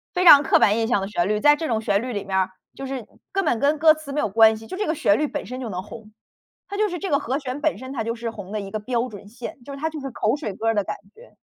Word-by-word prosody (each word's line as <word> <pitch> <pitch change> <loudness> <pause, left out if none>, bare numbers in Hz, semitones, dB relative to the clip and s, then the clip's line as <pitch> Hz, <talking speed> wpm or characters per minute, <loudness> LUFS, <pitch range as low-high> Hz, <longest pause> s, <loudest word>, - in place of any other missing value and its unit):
非 365 - +1
常 290 -4 +10
刻 290 - +4
板 205 - +4
印 225 - 0
象 240 -4 +2
的 195 - -3
旋 190 -2 -1
律， 210 0 +1
在 295 +4 +6
这 320 +1 -4
种 225 -3 0
旋 205 -1 +1
律 250 - -4
里 205 - -3
面 195 -1 -4
儿 190 0 +2 0.2
就 270 - -7
是 260 -4 -5 0.3
根 390 0 0
本 230 - +1
跟 290 +2 +2
歌 315 +1 +6
词 310 -2 -9
没 290 - -1
有 - - +1
关 220 +1 +5
系， 225 - -12
就 370 - -7
这 415 +2 -2
个 315 - 0
旋 205 -6 +3
律 300 - +1
本 - - -5
身 250 +4 -7
就 240 - -4
能 185 -2 -4
红， 215 +1 -12 0.6
它 400 - -5
就 430 - +2
是 355 - -4
这 390 - -4
个 285 -5 +2
和 265 -1 -2
弦 270 -2 -5
本 310 -9 +1
身 260 +2 -8
它 225 -4 -2
就 230 - -2
是 235 0 -4
红 205 -3 -9
的 215 - -2
一 195 -1 -7
个 215 - -3
标 240 +2 -2
准 205 -3 -11
线， 245 +9 -8
就 280 - -8
是 275 - -7
它 315 - -1
就 315 -1 -7
是 270 -1 -5
口 220 +1 0
水 290 -9 -5
歌 220 - -5
儿 225 - +3
的 205 -2 +1
感 - - -4 0.2
觉。 - - -17
240 Hz, 360 characters per minute, -23 LUFS, 215-295 Hz, 0.6 s, 常